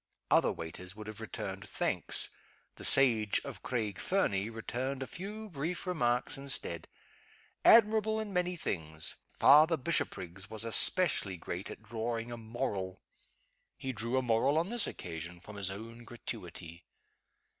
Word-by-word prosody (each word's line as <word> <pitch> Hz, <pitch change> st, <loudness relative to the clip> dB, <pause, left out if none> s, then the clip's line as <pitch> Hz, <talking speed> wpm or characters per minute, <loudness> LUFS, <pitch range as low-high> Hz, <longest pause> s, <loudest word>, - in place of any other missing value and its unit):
Other -, -, +4 dB
waiters 90 Hz, +3 st, -8 dB
would 110 Hz, 0 st, -9 dB
have 105 Hz, -1 st, -6 dB
returned -, -, -6 dB
thanks. -, -, 0 dB, 0.5 s
The -, -, -10 dB
sage 115 Hz, -6 st, +6 dB
of -, -, -8 dB
Craig 110 Hz, -5 st, -3 dB
Fernie 105 Hz, -, 0 dB
returned 130 Hz, +4 st, -4 dB
a -, -, -5 dB
few 210 Hz, +8 st, -7 dB
brief 165 Hz, +3 st, -4 dB
remarks 130 Hz, -6 st, 0 dB
instead. 125 Hz, -12 st, -1 dB, 0.8 s
Admirable 220 Hz, -1 st, +5 dB
in 215 Hz, -2 st, -5 dB
many 180 Hz, 0 st, 0 dB
things, 80 Hz, -, -3 dB
Father 155 Hz, +3 st, +5 dB
Bishopriggs 100 Hz, -, -3 dB
was 110 Hz, 0 st, 0 dB
especially 115 Hz, -, +6 dB
great 90 Hz, +3 st, -6 dB
at -, -, -10 dB
drawing 115 Hz, +1 st, -4 dB
a 120 Hz, -, -6 dB
moral. 100 Hz, -5 st, -4 dB, 0.7 s
He 135 Hz, -, -4 dB
drew 115 Hz, +3 st, -2 dB
a 130 Hz, -, +1 dB
moral 125 Hz, +5 st, +2 dB
on 170 Hz, +4 st, 0 dB
this 235 Hz, -2 st, 0 dB
occasion 85 Hz, +1 st, -7 dB
from 105 Hz, +3 st, -12 dB
his 100 Hz, -2 st, -1 dB
own 115 Hz, +4 st, -9 dB
gratuity. 90 Hz, -8 st, -8 dB
115 Hz, 140 wpm, -31 LUFS, 100-150 Hz, 0.8 s, sage